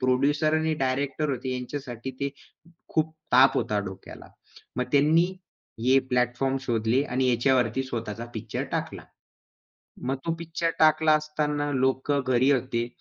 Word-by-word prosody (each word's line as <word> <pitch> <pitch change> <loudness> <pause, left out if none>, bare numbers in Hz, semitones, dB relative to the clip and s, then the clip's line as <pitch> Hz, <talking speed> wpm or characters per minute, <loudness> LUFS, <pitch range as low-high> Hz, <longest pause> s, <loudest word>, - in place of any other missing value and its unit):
Producer 140 +4 +2
आणि 160 0 +1
director 140 +2 -1
होते 130 -1 -3
यांच्यासाठी 125 -1 -5
ते 140 - 0 0.6
खूप 155 0 0 0.2
ताप 130 +2 +7
होता 105 -1 0
डोक्याला. 95 - -10 0.5
मग 125 - 0
त्यांनी 150 +4 +5 0.6
हे 130 +2 +5
प्लॅटफॉर्म 125 +2 +1
शोधले 120 0 +1
आणि 130 -1 0
याच्यावरती 125 0 +2
स्वतःचा 115 -3 -5
पिक्चर 110 - -4
टाकला. - - -3 1.0
मग 135 +2 0
तो 165 - 0
पिक्चर 165 0 -2
टाकला 155 0 +5
असताना 150 -1 -1
लोक 130 +1 0
घरी 130 -1 +2
होते. 120 -3 0
135 Hz, 130 wpm, -26 LUFS, 125-150 Hz, 1.0 s, ताप